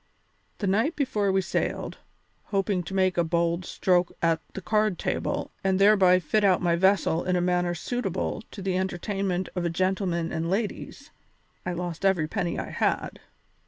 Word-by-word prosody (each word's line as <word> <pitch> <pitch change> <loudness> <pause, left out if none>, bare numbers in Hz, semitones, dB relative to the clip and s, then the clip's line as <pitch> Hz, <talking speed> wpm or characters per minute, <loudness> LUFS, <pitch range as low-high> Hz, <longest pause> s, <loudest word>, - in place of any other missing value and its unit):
The 205 - -3
night 220 - +1
before 215 -8 0
we 190 0 +2
sailed, 175 - -3 0.5
hoping 195 -2 0
to 195 - -5
make 185 -2 +2
a - - +4
bold 170 +1 0
stroke 180 -1 +1
at 165 -1 +1
the - - -3
card 215 -3 +1
table - - -2
and 190 -1 +2
thereby 195 -2 +6
fit 185 +5 0
out 190 -3 +4
my 170 -2 +2
vessel 185 -2 +2
in 185 - 0
a - - +2
manner 175 0 +1
suitable 195 0 -3
to 195 - -9
the 190 -1 0
entertainment 190 0 -2
of 180 - -1
a 170 - +1
gentleman 180 -1 -1
and 165 +1 -2
ladies, 205 +3 -3 0.6
I 180 - -1
lost 175 -1 -5
every 185 -5 +2
penny 175 -1 -2
I - - -4
had. - - -1
185 Hz, 170 wpm, -26 LUFS, 175-195 Hz, 0.6 s, thereby